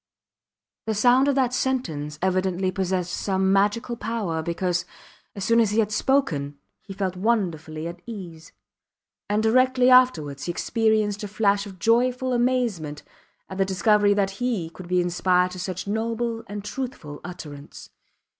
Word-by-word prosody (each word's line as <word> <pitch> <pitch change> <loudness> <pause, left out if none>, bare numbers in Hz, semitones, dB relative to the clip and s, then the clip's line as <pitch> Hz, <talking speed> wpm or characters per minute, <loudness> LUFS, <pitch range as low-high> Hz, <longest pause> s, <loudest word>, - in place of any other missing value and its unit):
The 220 - 0
sound 250 +5 +4
of 280 - +2
that 255 -2 +1
sentence 165 - -2
evidently 185 0 +1
possessed 185 -1 -2
some 190 -1 +1
magical 210 +5 +1
power, 210 -9 -2
because, 175 +1 -1 0.5
as 200 - -4
soon 230 0 +4
as 225 -3 +3
he 210 - -1
had 215 -2 +2
spoken, 160 - 0 0.2
he 200 - -12
felt 190 -1 -2
wonderfully 170 -7 -1
at 170 +1 -8
ease; 175 -8 -9 0.8
and 210 +1 +1
directly 255 +2 +4
afterwards 160 - +4
he 175 - -1
experienced 215 +1 0
a - - -3
flash 205 0 +1
of 190 -2 -11
joyful 250 +5 +2
amazement 240 -12 0 0.4
at 190 - -8
the - - +5
discovery 205 +2 +3
that 195 -1 -1
he 205 -10 -1
could 175 +2 -11
be 180 0 +2
inspired 180 +1 +2
to 185 - -8
such 185 0 -4
noble 230 +2 -2
and 205 0 -6
truthful 210 - -6
utterance. 150 -5 -10
200 Hz, 150 wpm, -24 LUFS, 175-230 Hz, 0.8 s, the